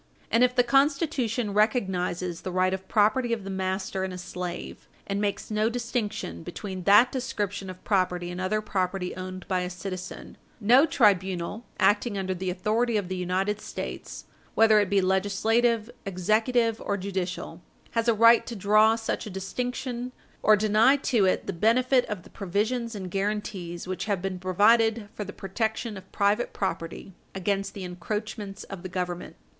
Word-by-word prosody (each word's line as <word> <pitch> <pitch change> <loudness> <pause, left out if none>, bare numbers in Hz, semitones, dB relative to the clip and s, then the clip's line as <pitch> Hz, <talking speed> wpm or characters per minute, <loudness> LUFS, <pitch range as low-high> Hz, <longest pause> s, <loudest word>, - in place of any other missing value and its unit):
And 230 - +4
if 250 0 +3
the 245 - +5
Constitution 270 -4 +1
recognises 185 -5 0
the 185 - -4
right 185 +1 +2
of 190 0 -5
property 230 +3 +2
of 225 -3 -3
the 195 - -5
master 190 0 -2
in 190 - -3
a 180 - -6
slave, 180 0 -6 0.2
and 200 0 -2
makes 200 +1 -2
no 215 +1 +2
distinction 230 - -3
between 185 - -6
that 210 +5 +7
description 205 -7 -3
of 185 0 -10
property 180 -3 0
and 180 +1 -5
other 215 +3 0
property 190 -3 -2
owned 185 0 -7
by 185 -1 +1
a 180 0 -2
citizen, 185 +1 -7 0.2
no 250 +9 +6
tribunal, 195 - +1
acting 205 +1 +2
under 190 -1 -1
the 185 0 -3
authority 215 +5 +1
of 195 -3 -3
the 185 - -2
United 185 +3 -1
States, - - -6 0.3
whether 220 -1 +6
it 205 -2 +1
be 200 -1 +3
legislative, 210 +4 +2 0.2
executive, 220 +5 +1
or 200 - -1
judicial, 185 -3 -4 0.3
has 230 0 0
a 235 - +5
right 230 +2 +6
to 235 - -5
draw 215 +2 +4
such 225 -1 -3
a - - -5
distinction 245 +5 -4 0.3
or 215 - +6
deny 215 +5 +4
to 240 -7 +2
it 185 - +1
the - - -3
benefit 245 +7 +3
of 205 -5 -5
the - - -16
provisions 220 +4 -2
and 190 -3 -6
guarantees 195 -4 -3
which 185 +2 -3
have 200 -3 0
been 185 0 -4
provided 215 +4 +3
for 210 - -4
the 200 - -7
protection 220 +3 -3
of 190 -1 -11
private 205 +4 +1
property 185 0 -4 0.2
against 195 +1 -1
the 195 - -6
encroachments 200 +3 -5
of 195 -3 -8
the 185 - -6
Government. 180 -1 -4
200 Hz, 170 wpm, -27 LUFS, 185-225 Hz, 0.3 s, that